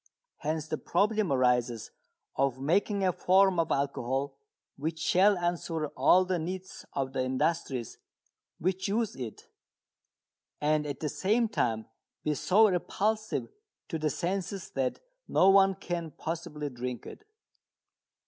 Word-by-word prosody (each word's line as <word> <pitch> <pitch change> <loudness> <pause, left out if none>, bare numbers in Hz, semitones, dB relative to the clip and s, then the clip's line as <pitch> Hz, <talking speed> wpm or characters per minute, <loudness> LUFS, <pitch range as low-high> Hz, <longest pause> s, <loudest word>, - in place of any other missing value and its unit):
Hence 155 0 -2
the 155 - -3
problem 210 +1 +1
arises 125 -3 +1 0.4
of 135 -1 +1
making 195 +7 +1
a 185 -1 +3
form 190 0 +4
of 165 - +1
alcohol 135 0 -1 0.4
which 160 +3 -3
shall 190 +5 +4
answer 170 -3 -2
all 180 +8 +4
the 185 -1 0
needs 185 +3 -6
of 135 -1 -2
the 130 -1 0
industries 130 -2 -1 0.6
which 185 +3 -1
use 220 +1 0
it, 120 -4 -7 1.2
and 150 0 +1
at 145 - -5
the 155 - 0
same 220 - +1
time 115 - -1 0.4
be 150 - +1
so 205 +9 +4
repulsive 215 +3 -1 0.4
to 160 - -2
the 155 0 +1
senses 185 +4 -3
that 130 -2 -1 0.3
no 190 - +5
one 195 0 +5
can 175 -3 -4
possibly 155 -2 -5
drink 125 0 -5
it. - - -10
165 Hz, 130 wpm, -29 LUFS, 135-190 Hz, 1.2 s, no